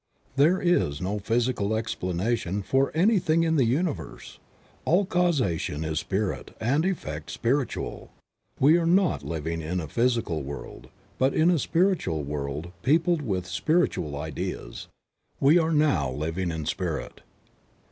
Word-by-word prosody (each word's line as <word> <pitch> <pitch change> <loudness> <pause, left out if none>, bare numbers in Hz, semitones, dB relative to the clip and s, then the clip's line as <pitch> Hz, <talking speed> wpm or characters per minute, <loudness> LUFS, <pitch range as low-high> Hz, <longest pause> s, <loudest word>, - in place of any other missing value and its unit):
There 160 +7 +4
is 175 - +1
no 100 +4 -2
physical 115 -1 0
explanation 100 -1 -2
for 135 +7 +1
anything 170 -3 +3
in 160 -1 +2
the 135 -5 +4
universe; 145 +7 -3 0.4
all 185 +5 +3
causation 135 - 0
is 80 -1 -1
Spirit 100 0 -3
and 130 +8 +1
all 190 - +2
effect 75 - -5
spiritual. 130 +3 -2 0.5
We 155 +6 +6
are 165 - 0
not 180 -1 +3
living 80 0 -3
in 85 +4 -2
a 80 - -4
physical 115 - 0
world 70 +1 -8 0.3
but 135 +1 +2
in 165 +3 +4
a 170 - +2
spiritual 165 - +1
world 75 +3 -4
peopled 165 +3 +2
with 95 -9 -2
spiritual 90 - 0
ideas. 75 -5 -5 0.5
We 150 +6 +5
are 160 0 +1
now 150 - +2
living 80 +7 -2
in 80 -2 -4
Spirit. - - -3
115 Hz, 135 wpm, -26 LUFS, -, 0.5 s, We